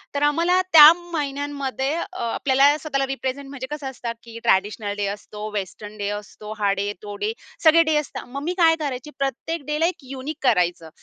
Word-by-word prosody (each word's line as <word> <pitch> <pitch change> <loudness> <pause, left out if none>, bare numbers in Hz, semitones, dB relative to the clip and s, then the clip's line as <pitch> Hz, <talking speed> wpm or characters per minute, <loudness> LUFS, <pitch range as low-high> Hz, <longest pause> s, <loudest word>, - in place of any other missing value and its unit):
तर 285 - 0
आम्हाला 340 +5 +2
त्या 305 -1 +12
महिन्यांमध्ये 285 -5 -3
अ, 370 +2 -5
आपल्याला 280 +2 +4
स्वतःला 275 -3 -1
रिप्रेझेंट 270 +1 -4
म्हणजे 265 -2 -6
कसं 295 -2 -4
असतं 240 -2 -5
की 230 -1 -10
ट्रेडिशनल 205 +2 +1
डे 205 - -1
असतो, 210 0 -8
वेस्टर्न 210 +1 -6
डे 205 -1 -2
असतो, 210 +1 -10
हा 200 -1 +2
डे, 200 +1 -2
तो 205 -1 -6
डे, 435 - -1 0.3
सगळे 330 +1 +7
डे 315 -1 +1
असतात. 300 - -4
मग 275 +3 -6
मी 345 +4 -1
काय 325 -2 +5
करायची 280 -2 -4
प्रत्येक 275 +3 -3
डेला 300 +2 0
एक 340 -4 -2
युनिक 275 +3 -5
करायचं. 175 -8 +1
275 Hz, 185 wpm, -23 LUFS, 215-305 Hz, 0.3 s, त्या